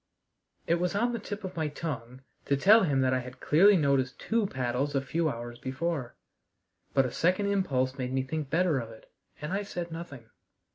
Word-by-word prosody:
It 170 +1 +2
was 180 +2 -1
on 240 +4 +1
the 235 - -2
tip 205 0 -6
of 190 -1 -6
my 160 -2 -1
tongue 130 -5 -6 0.2
to 140 - +1
tell 210 +10 +7
him 140 -4 +2
that 130 0 +2
I 130 - +2
had 125 +1 -9
clearly 190 +6 +5
noticed 140 -4 +1
two 225 -2 0
paddles 130 0 -2
a - - +4
few 160 +4 0
hours 120 -1 -6
before, 130 0 -3 0.8
but 135 -1 +5
a 125 - -3
second 185 +8 +1
impulse 135 -9 0
made 125 0 -2
me 130 0 0
think 150 +1 -4
better 165 -2 +2
of 115 -2 -6
it, 110 -1 -15 0.3
and 150 +5 -4
I 200 - 0
said 175 -4 -5
nothing. 145 -8 -8
145 Hz, 200 wpm, -29 LUFS, 130-180 Hz, 0.8 s, tell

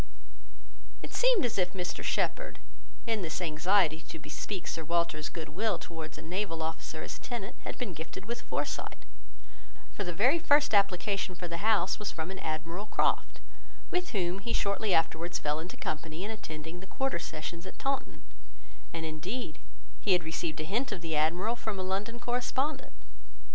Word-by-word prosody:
It - - -6
seemed - - +5
as 230 - 0
if 180 -1 +2
Mr 180 -2 -2
Shepherd, - - +1 0.5
in 225 -3 +1
this 160 -3 -1
anxiety 165 0 +3
to - - -4
bespeak 185 +4 -4
Sir 165 - -2
Walter's 170 -2 +1
good 160 -2 -5
will 205 +2 +1
towards 160 -2 -6
a - - -8
naval 165 -1 -1
officer 160 0 -3
as - - -5
tenant, 235 -2 -4
had - - -3
been 235 -8 -2
gifted 160 +4 -6
with 235 +2 -3
foresight; - - -2 0.9
for 205 - -2
the 175 - -1
very 250 - +5
first 290 -4 +5
application 195 -1 +3
for 175 0 -4
the 170 0 -2
house 205 -1 +3
was 210 - -1
from 160 +2 -3
an 190 - -5
Admiral 165 +6 -2
Croft, - - +2 0.5
with 360 0 +1
whom 185 -2 +1
he 215 +4 -2
shortly 200 +1 +2
afterwards 170 0 +3
fell 150 +1 0
into 170 +3 -6
company 155 +2 -3
in 210 - -2
attending 160 -5 -6
the 190 - -10
quarter 270 -7 0
sessions 170 +2 -5
at - - -9
Taunton; 275 0 -1 0.7
and 165 -1 -3
indeed, 160 +3 -3 0.4
he 200 - +4
had 180 -1 +4
received 160 0 -2
a - - 0
hint 230 +11 0
of 175 - -3
the 165 -2 -1
Admiral 175 +9 +3
from 220 -4 -3
a 185 - -1
London 200 +5 -1
correspondent. 255 +4 0
180 Hz, 175 wpm, -32 LUFS, 160-220 Hz, 0.9 s, seemed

